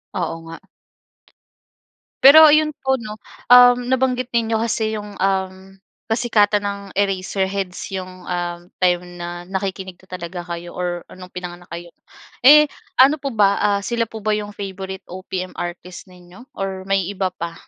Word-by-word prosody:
Oo 170 -3 -2
nga. 165 - -8 1.7
Pero 310 +3 +10
'yon 305 0 +3
po 265 0 +1
'no, 215 -3 -7 0.4
um, 245 0 +9 0.2
nabanggit 255 -1 0
niyo 225 -1 +1
kasi 220 -1 -1
'yong, 205 0 -8
um, 190 0 -2 0.3
kasikatan 210 -3 +2
ng 200 0 -3 0.2
Eraserheads 195 -1 -2
'yong, 185 -1 -7
um, 175 -1 -3 0.2
time 180 -1 +2 0.2
na 175 0 -6
nakikinig 190 -1 -5
na 190 - -22
talaga 180 -1 -6
kayo 175 0 -7
or 175 -1 -3
no'ng 185 0 -11
pinanganak 175 -1 -8
kayo. 170 0 -8 0.5
Eh, 300 +4 +8 0.3
ano 275 +3 +6
po 275 - -2
ba, 200 -1 +3
ah, 200 -1 +2
sila 230 -2 -1
po 220 - -8
ba 215 - +1
'yong 210 -1 -4
favorite 190 -1 -7
OPM 185 0 -6
artist 175 +1 -7
ninyo 180 +6 -16
or 190 -1 -4
may 195 -2 +2
iba 190 -2 -1
pa? 170 -2 -6
195 Hz, 150 wpm, -20 LUFS, 180-220 Hz, 1.7 s, Pero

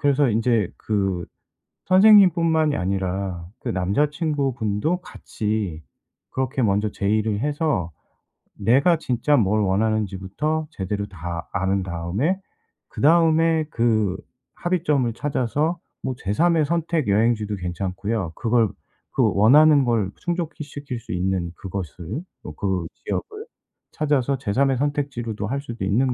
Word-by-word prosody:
그래서 145 -1 +3
인제 110 -3 +1
그 95 -4 -1 0.6
선생님 195 0 +7
뿐만이 160 -3 +2
아니라 95 -2 -2
그 - - -5
남자친구 140 - 0
분도 110 - -1
같이 105 - -4 0.5
그렇게 130 0 -1
먼저 105 0 +2
제의를 105 +1 0
해서 145 - -1 0.6
내가 140 +9 +3
진짜 130 +2 +1
뭘 105 0 +2
원하는지부터 110 +9 -1
제대로 100 - -3
다 85 -2 -6
안 95 0 0
다음에 95 - -1 0.5
그다음에 160 0 +3
그 110 - +1 0.4
합의점을 150 -9 0
찾아서 145 +6 -1 0.2
뭐 130 - -1
제삼의 160 - +2
선택 165 -2 0
여행지도 105 0 +2
괜찮고요. 95 +1 -3
그걸 115 -2 +2 0.4
그 - - +2
원하는 145 +7 +6
걸 110 -5 +1
충족 170 -2 -3
시킬 145 -4 -6
수 - - -10
있는 90 -1 -1
그것을 95 - -6 0.2
뭐 75 - -8
그 95 -2 -1 0.2
지역을 425 +1 -4 0.5
찾아서 140 -3 0
제삼의 135 +3 +1
선택지로도 125 -7 -2
할 140 +4 -2
수도 120 -6 -6
있는 125 +6 +2
115 Hz, 270 characters per minute, -23 LUFS, 100-150 Hz, 0.6 s, 선생님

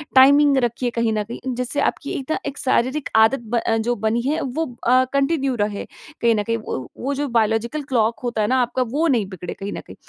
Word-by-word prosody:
Timing 280 +2 +6
रखिए 240 0 0
कहीं 230 -1 +1
न 210 -1 0
कहीं। 230 +3 -8 0.2
जिससे 250 +3 -2
आपकी 280 - -1
एक 270 +3 -6
न, - - +1
एक 280 0 -4
शारीरिक 260 +2 0
आदत 220 +5 +5
ब 240 - +1
अ, 225 0 0
जो 235 +2 0
बनी 220 +2 0
है। 300 +4 0
वो 275 +5 -2 0.2
अ, 255 +2 +5
कंटिन्यू 275 -1 +1
रहे, 205 -1 -2 0.4
कहीं 235 -1 +4
न 210 - 0
कहीं 230 +2 -1
व 130 - -5
वो 275 +3 -2
जो 290 +1 -2
बायोलॉजिकल 230 +4 0
क्लॉक 235 -5 0
होता 240 -3 -1
है 210 - +1
ना 255 - +2
आपका 245 +1 -1
वो 305 +7 +1
नहीं 240 -9 +2
बिगड़े 180 -2 -6
कहीं 200 +1 -6
न - - -5
कहीं। - - -12
245 Hz, 230 wpm, -21 LUFS, 225-275 Hz, 0.4 s, Timing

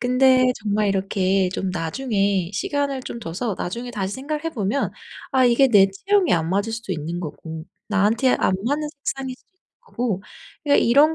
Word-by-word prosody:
근데 255 0 +4
정말 210 0 +1
이렇게 195 -1 +1
좀 185 +1 -2
나중에 195 0 -1
시간을 275 +5 -1
좀 235 - -6
둬서 205 +3 -3
나중에 235 +7 -4
다시 200 -4 -3
생각을 300 +4 -4
해 330 - -1
보면 235 0 -1 0.4
아 260 -1 +4
이게 250 +3 +5
내 200 -5 +6
체형에 385 - +1
안 165 -1 +1
맞을 200 +4 0
수도 225 -4 -4
있는 165 +1 -4
거고 160 -1 -7 0.2
나한테 215 +5 +2
안 - - +2
맞는 300 +3 0
색상일 270 -3 -5
수도 - - -32
있는 370 - -48 0.2
거고 240 - -3 0.4
그냥 285 -1 +4
이런 285 +7 +5
225 Hz, 340 characters per minute, -22 LUFS, 195-270 Hz, 0.4 s, 내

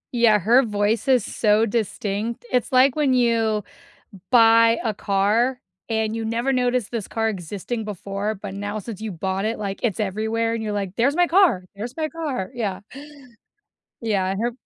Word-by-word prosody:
Yeah, 230 -3 +4
her 235 +8 +4
voice 210 0 0
is 255 -4 +4
so 215 0 +2
distinct. 220 +1 -3
It's 250 -2 0
like 255 +1 +5
when 285 -4 +2
you 230 -4 +2 0.7
buy 230 -1 +6
a 220 -2 0
car 215 +6 +1 0.3
and 220 -1 -1
you 225 0 -3
never 235 +4 0
noticed 250 -3 0
this 225 -4 -4
car 225 0 -1
existing 205 +4 -4
before, 205 +1 -4
but 195 0 -7
now 205 +1 -4
since 215 -1 -8
you 220 -1 -4
bought 190 +2 -3
it, 225 +1 -2
like, 200 -2 -4
it's 220 -6 0
everywhere 220 +3 -1
and 230 - -3
you're, 215 -1 -3
like, 200 -2 -3
"There's 275 +6 +2
my 355 0 +4
car. 345 - +3
There's 230 +5 -7
my 315 -1 -1
car," 290 - -4
yeah. 210 -6 -3 1.2
Yeah, 210 -5 0
and 195 +2 -3
her 240 +1 0
220 Hz, 175 wpm, -22 LUFS, 205-240 Hz, 1.2 s, buy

